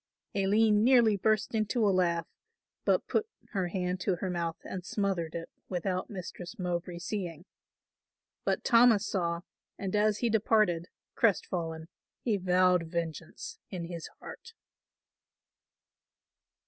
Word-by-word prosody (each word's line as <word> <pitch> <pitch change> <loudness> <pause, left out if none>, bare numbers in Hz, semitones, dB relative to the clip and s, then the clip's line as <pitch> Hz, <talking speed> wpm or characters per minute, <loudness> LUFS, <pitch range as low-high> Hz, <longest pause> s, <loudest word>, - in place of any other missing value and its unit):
Aline 210 +2 +4
nearly 235 -4 +6
burst 215 +3 +1
into 215 0 +1
a - - +4
laugh, 170 -3 +2 0.6
but - - +3
put 435 - +1 0.2
her 190 -4 0
hand 180 0 -2
to 185 0 +1
her 185 +1 -3
mouth 170 -2 -2
and 185 -1 -5
smothered 190 -5 -1
it 165 0 -4 0.2
without 185 0 -2
Mistress 185 0 -7
Mowbray 175 -1 -2
seeing; 175 -2 -4 1.0
but - - 0
Thomas 230 -4 +6
saw 170 -3 -1 0.4
and 195 0 -3
as 210 0 +3
he 235 - +1
departed, 210 -6 +3 0.3
crest 225 -5 +3
fallen, 165 -2 -4 0.4
he 225 -4 +2
vowed 180 -2 +3
vengeance 165 -2 -5
in 180 -3 -4
his 170 -1 -6
heart. 465 -1 -10
185 Hz, 125 wpm, -30 LUFS, 170-210 Hz, 1.0 s, nearly